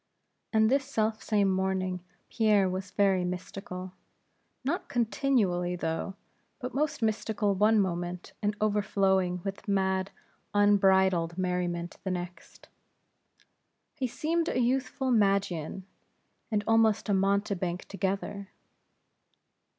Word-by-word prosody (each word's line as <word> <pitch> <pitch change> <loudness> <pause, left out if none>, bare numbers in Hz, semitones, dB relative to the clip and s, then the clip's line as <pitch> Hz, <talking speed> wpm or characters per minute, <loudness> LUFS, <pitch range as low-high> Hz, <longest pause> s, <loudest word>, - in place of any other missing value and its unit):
And 220 0 +4
this 275 +1 +3
self 220 -5 -1
same 205 -3 +2
morning 190 -1 0 0.3
Pierre 210 -4 +3
was 185 +1 -4
very 195 -3 +2
mystical; 180 0 -6 0.7
not 310 +7 -2
continually, 210 -7 +1
though; 165 +3 -3 0.4
but 250 - -5
most 295 -3 -1
mystical 215 -1 0
one 210 +3 +4
moment, 175 -2 -2
and 210 0 0
overflowing 195 -3 +1
with 195 +1 -6
mad, 190 -1 +1 0.5
unbridled 190 -4 +4
merriment, 180 -2 -2
the 190 - -2
next. 180 -1 -6 1.3
He 270 -5 -2
seemed 330 +7 -1
a - - 0
youthful 260 +1 0
Magian, 195 -5 +1 0.6
and 210 -3 0
almost 225 -1 +3
a 205 - +2
mountebank 195 -2 0
together. 200 0 -3
195 Hz, 105 wpm, -29 LUFS, 185-220 Hz, 1.3 s, And